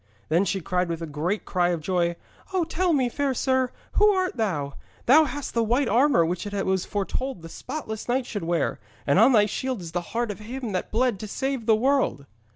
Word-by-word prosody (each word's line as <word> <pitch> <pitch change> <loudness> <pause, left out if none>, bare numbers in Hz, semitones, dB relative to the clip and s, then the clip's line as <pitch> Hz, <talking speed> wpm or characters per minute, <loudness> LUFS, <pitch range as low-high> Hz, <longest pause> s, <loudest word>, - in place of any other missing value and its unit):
Then 170 +5 +3
she 195 +1 -1
cried 180 +2 -1
with 165 0 -3
a - - -2
great 165 +7 -2
cry 175 -2 +1
of 175 -2 0
joy. 170 +1 0 0.4
'Oh, 370 -2 +2
tell 345 +2 0
me, 270 -5 +2
fair 275 +2 -1
sir, 260 0 +1 0.2
who 420 0 +5
art 370 -5 +1
thou? 160 - -1 0.3
Thou 310 +6 +7
hast 290 -1 -5
the 235 - +2
white 240 +4 +2
armour 240 - +4
which 175 +4 -3
it 200 -1 -2
was 190 -1 0
foretold 205 +1 -3
the 165 - -8
spotless 245 - -6
knight 255 +1 +1
should 205 -6 -5
wear, 170 -3 0 0.3
and 140 +6 +3
on 235 +5 +7
thy 210 -4 +5
shield 255 +3 -3
is 170 -2 -8
the 175 +1 -1
Heart 230 +5 -2
as 205 - -8
of 210 - -11
Him 250 -2 -4
that 185 - -3
bled 235 -2 +1
to 215 - -6
save 265 +1 -3
the 220 - +6
world.' 255 - +1
220 Hz, 225 wpm, -25 LUFS, 180-260 Hz, 0.4 s, Thou